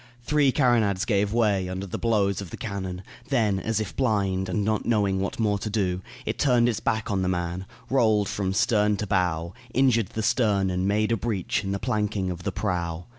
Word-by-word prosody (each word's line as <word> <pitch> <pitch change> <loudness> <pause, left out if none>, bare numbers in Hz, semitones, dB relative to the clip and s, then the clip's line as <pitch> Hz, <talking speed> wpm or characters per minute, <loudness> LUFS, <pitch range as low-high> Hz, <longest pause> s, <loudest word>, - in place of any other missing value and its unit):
Three 145 0 +3
carronades 115 -8 +2
gave 100 -3 +1
way 105 -5 +1
under 95 +1 -4
the 95 - -5
blows 100 -4 +1
of 95 - -7
the - - -8
cannon; 95 -3 -5 0.3
then, 110 -7 +2
as 110 +2 -1
if 110 -3 -4
blind 100 -7 0
and 100 +3 0
not 110 0 0
knowing 100 -4 +1
what 100 - -3
more 105 -3 +1
to 105 - -4
do, 95 -4 -1 0.2
it - - -3
turned 125 -4 +4
its 115 -3 0
back 110 -1 -1
on 95 -2 0
the 90 - 0
man, 90 +1 -3 0.2
rolled 110 -6 +3
from 95 -2 -2
stern 105 0 +2
to 105 - -2
bow, 90 -3 0 0.2
injured 120 -5 +3
the 110 - -4
stern 105 -5 +2
and 90 +1 -1
made 105 +2 +1
a 115 - +2
breach 100 -2 -1
in 95 - -3
the 100 - 0
planking 105 -2 -1
of 90 0 -6
the 100 - -2
prow. 85 -3 -2
100 Hz, 210 wpm, -25 LUFS, 95-110 Hz, 0.3 s, turned